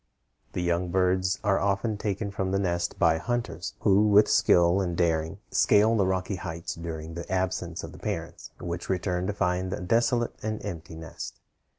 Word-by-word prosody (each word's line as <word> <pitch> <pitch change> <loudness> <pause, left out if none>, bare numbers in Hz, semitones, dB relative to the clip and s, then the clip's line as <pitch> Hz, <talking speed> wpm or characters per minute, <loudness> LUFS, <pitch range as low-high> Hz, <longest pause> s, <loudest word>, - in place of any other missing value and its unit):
The 90 - -2
young 85 +1 0
birds 95 +1 +2
are 100 -1 +3
often 100 +2 0
taken 100 0 -3
from 95 -1 -2
the 95 - +1
nest 85 -3 -1
by 80 -1 +3
hunters, 95 -6 -3
who 105 +1 +4
with 105 0 +6
skill 85 +2 +4
and 85 -3 -2
daring 80 0 +1
scale 110 +2 +4
the 100 -4 +2
rocky 95 +1 -1
heights 85 -1 -5
during 80 -1 -6
the 85 +1 -7
absence 95 0 -1
of - - -7
the - - -12
parents, - - -5
which 85 0 -5
return 90 -1 -1
to 105 - -1
find 90 -2 0
a - - -3
desolate 115 +5 +1
and 110 0 -3
empty 85 -1 -6
nest. 80 0 -8
95 Hz, 180 wpm, -27 LUFS, 85-100 Hz, -, with